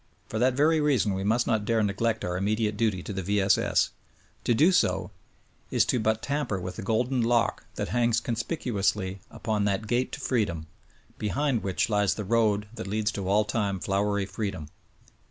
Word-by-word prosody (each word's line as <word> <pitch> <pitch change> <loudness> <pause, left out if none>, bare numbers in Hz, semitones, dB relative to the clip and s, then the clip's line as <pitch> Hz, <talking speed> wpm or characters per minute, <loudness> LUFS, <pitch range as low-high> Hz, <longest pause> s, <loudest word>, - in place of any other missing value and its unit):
For 110 - -2
that 125 +1 +3
very 155 +3 +3
reason 130 -9 +2
we 95 0 -2
must 115 +4 +2
not 110 -2 +1
dare 110 +1 +1
neglect 105 +2 0
our 90 0 -2
immediate 105 +3 0
duty 105 -5 0
to 105 - -5
the 95 - -3
V. 100 +3 0
S. 95 0 +4
S. - - +1 0.5
To 145 +10 +4
so 95 - +1 0.6
do - - -7
is - - +5
to 125 - +1
but 110 0 0
tamper 140 -9 -1
with 90 0 -6
the - - -4
golden 120 +5 0
lock 115 0 +1
that - - -3
hangs 120 -1 +2
conspicuously 110 - -2
upon 105 -2 -2
that 105 +2 0
gate 120 +4 0
to - - -4
freedom, 100 -11 -1 0.5
behind 125 +3 0
which 95 -2 0
lies 105 -3 +2
the 105 - -4
road 105 -1 +2
that 110 -3 -6
leads 105 +1 0
to 100 -3 -4
all 105 +2 +3
time 105 -3 -1
flowery 100 +1 0
freedom. 95 -7 -4
110 Hz, 190 wpm, -27 LUFS, 100-115 Hz, 0.6 s, is